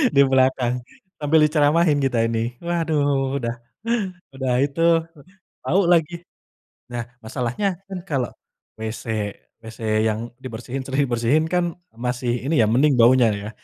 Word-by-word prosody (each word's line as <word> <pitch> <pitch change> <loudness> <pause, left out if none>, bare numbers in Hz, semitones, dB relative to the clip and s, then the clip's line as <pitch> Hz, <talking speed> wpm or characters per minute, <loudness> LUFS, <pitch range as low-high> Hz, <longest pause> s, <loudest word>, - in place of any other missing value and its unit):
di 140 - +7
belakang, 130 -2 +2 0.5
sambil 155 +2 +4
diceramahin 150 0 +3
kita 120 -4 +1
ini. 115 +1 -2
Waduh, 145 -5 0
udah 115 -3 -2 0.8
udah 130 -2 -1
itu, 145 +3 -4 0.8
tahu 190 +4 +3
lagi. 165 -1 +2 0.8
Nah, 120 -1 -3 0.2
masalahnya 125 - -2 0.2
kan, 190 -2 -5
kalau 135 -5 0 0.5
WC 110 0 -5 0.6
WC 110 +1 -11 0.3
yang 110 0 -1 0.2
dibersihin, 125 +2 -5
sering 135 +1 +1
dibersihin 120 +6 +2
kan 175 -2 +1 0.2
masih 125 +1 -2 0.2
ini 160 - +1
ya, - - +2
mending 140 +3 +4
baunya, 120 +1 +6 0.2
ya. 105 - -5
130 Hz, 130 wpm, -22 LUFS, 120-150 Hz, 0.8 s, di